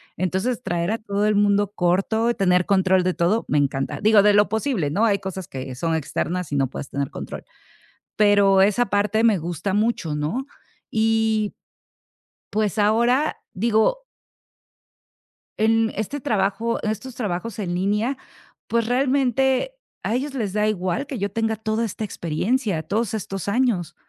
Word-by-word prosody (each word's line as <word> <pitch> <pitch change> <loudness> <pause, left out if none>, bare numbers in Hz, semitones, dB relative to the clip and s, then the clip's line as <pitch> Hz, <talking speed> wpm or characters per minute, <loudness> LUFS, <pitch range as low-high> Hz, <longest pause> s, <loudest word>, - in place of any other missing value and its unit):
Entonces, 190 +8 -1
traer 175 0 -1
a 225 - 0
todo 205 -1 -1
el 210 - +2
mundo 205 0 +2
corto, 195 +7 +1
tener 180 -3 +2
control 190 -2 +3
de 185 0 +1
todo, 190 +7 +1
me 150 - +2
encanta. 140 +1 -1
Digo, 210 -1 +5
de 210 0 +5
lo 205 0 +4
posible, 220 - -1
¿no?, 210 +10 +1
hay 200 -3 +2
cosas 190 -2 -6
que 130 -1 -6
son 165 +4 -1
externas 165 +2 -3
y - - -1
no 135 -1 +2
puedes 140 - -6
tener 140 -1 -3
control. - - -7 0.7
Pero 200 -2 +5
esa 210 +5 +3
parte 210 +3 +1
me 215 -4 +4
gusta 175 +4 -3
mucho, 205 -8 0
¿no? 165 - -2 0.4
Y, 220 -1 +1 1.0
pues, 215 0 -1
ahora, 235 +8 +2 0.2
digo 230 - +1 1.5
En 225 0 +2
este 220 +7 -3
trabajo 215 +1 0
en 215 - 0
estos 250 +3 -7
trabajos 210 -1 -3
en 175 -3 -2
línea, 210 +8 0 0.5
pues, 230 -1 +1
realmente, 265 - +1 0.3
a - - -1
ellos 270 +3 -2
les 205 -6 -2
da 210 0 +1
igual 195 +6 -1
que 270 - -5
yo 200 -1 -2
tenga 225 0 0
toda 220 +1 -2
esta 220 0 -4
experiencia, 190 +1 -1
todos 215 +6 -1
estos 195 -2 -5
años. 200 -7 0
210 Hz, 155 wpm, -23 LUFS, 185-225 Hz, 1.5 s, Digo